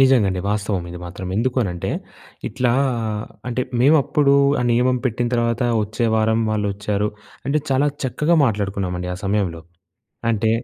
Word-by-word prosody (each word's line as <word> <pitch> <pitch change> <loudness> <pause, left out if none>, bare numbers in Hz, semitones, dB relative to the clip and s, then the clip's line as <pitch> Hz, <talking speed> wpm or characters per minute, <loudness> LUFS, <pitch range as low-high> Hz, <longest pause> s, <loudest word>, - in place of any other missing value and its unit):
నిజంగా 130 -5 +5
అండి 95 -1 -2
వాస్తవం 100 -3 -1
ఇది 90 - -7
మాత్రం. 90 +1 -7
ఎందుకు 125 +3 0
అనంటే 90 -4 -3 0.6
ఇట్లా 125 -2 +1 0.8
అంటే 125 +1 -1 0.2
మేము 145 +5 +6
అప్పుడు 140 0 +2 0.3
ఆ - - +1
నియమం 125 +2 +3
పెట్టిన 120 0 0
తర్వాత 115 +1 +1 0.2
వచ్చే 110 +3 -2
వారం 110 +1 +2
వాళ్ళొచ్చారు. 105 0 -1 0.4
అంటే 150 +2 +2
చాలా 135 +2 +3 0.2
చక్కగా 150 +6 +1
మాట్లాడుకున్నామండి 100 -5 -1
ఆ - - -7
సమయంలో. 95 -5 0 0.7
అంటే 110 0 +1
110 Hz, 140 wpm, -21 LUFS, 100-125 Hz, 0.8 s, మేము